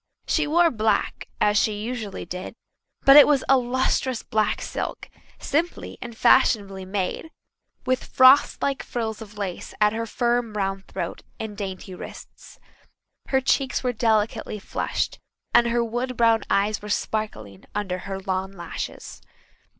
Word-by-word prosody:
She 315 -2 +1
wore 335 +2 +4
black, 220 -2 0
as 210 0 +3
she 210 -2 0
usually 220 -2 -5
did, 180 +5 -7 0.5
but 275 +1 +9
it 295 - +10
was 285 -3 +3
a 270 - +6
lustrous 255 0 0
black 215 -1 0
silk, - - -5 0.3
simply 325 +5 -2
and 235 -2 -8
fashionably 200 -7 +3
made, 195 - -3 0.6
with 255 0 0
frost 260 +2 +5
like 275 -1 0
frills 225 -2 -4
of 210 -1 -11
lace 195 -4 -5
at 210 0 +4
her 230 +1 -3
firm 240 0 0
round 195 -1 -2
throat - - -5 0.2
and 220 -2 -5
dainty 190 -2 -6
wrists. 180 - -11 0.7
Her 265 -1 +2
cheeks 265 0 +1
were 250 -1 0
delicately 220 -1 0
flushed, 205 - -3 0.3
and 240 - +6
her 235 0 +1
wood 240 +2 -3
brown 230 -2 +4
eyes 210 +2 +1
were 210 - -8
sparkling 210 - -3
under 190 -3 -2
her 195 +1 -5
long 190 0 -2
lashes. 175 -4 -7
220 Hz, 145 wpm, -24 LUFS, 200-250 Hz, 0.7 s, it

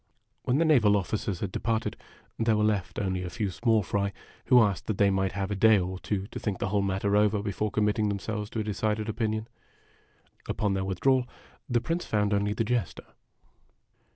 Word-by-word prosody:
When 125 - +2
the 165 - +3
naval 110 -10 +5
officers 100 -1 -3
had 100 - -2
departed, 115 +2 -1 0.4
there 110 -1 +2
were, 105 - +2
left 105 -3 0
only 95 -2 -1
a 90 - -4
few 100 +1 -2
small 110 +1 +2
fry 100 +2 -1 0.3
who 125 -2 +6
asked 105 -4 +1
that 110 - -1
they 100 -1 +4
might 95 0 0
have 100 0 -3
a - - 0
day 110 +2 +5
or 95 0 -3
two 95 -1 -2
to - - -5
think 100 -4 -2
the 95 - -2
whole 100 +1 +1
matter 100 +1 0
over 105 0 +3
before 105 +1 -2
committing 105 0 +1
themselves 105 +1 -3
to 115 - -4
a - - -2
decided 105 +1 -1
opinion. 110 0 -2 1.0
Upon 105 -2 0
their 95 -1 -1
withdrawal, 125 +7 +1 0.4
the 120 -2 +2
Prince 170 +5 -2
found 105 -1 +1
only 100 0 +1
the 115 - 0
Jester. 110 - -2
105 Hz, 195 wpm, -28 LUFS, 100-110 Hz, 1.0 s, who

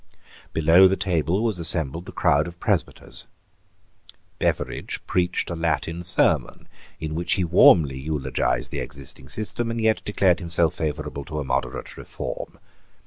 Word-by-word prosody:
Below 85 +4 +6
the 95 - +1
table 90 +1 0
was 110 -6 0
assembled 80 -1 0
the - - -7
crowd 75 +3 +2
of 85 0 -10
presbyters. - - -2 1.1
Beveridge - - -2
preached 90 -1 0
a - - -2
Latin 80 0 -1
sermon, 85 0 +2 0.3
in 80 -1 -4
which 85 +2 0
he 95 - +1
warmly 80 -5 +5
eulogized 75 0 -1
the - - -3
existing 70 -1 -6
system, 115 +2 -2
and 115 0 -2
yet 110 -1 +2
declared 95 -3 +2
himself 85 -2 +1
favourable 75 -2 -4
to 75 -2 -6
a - - -2
moderate 65 - -3
reform. - - -6
85 Hz, 140 wpm, -24 LUFS, 75-90 Hz, 1.1 s, Below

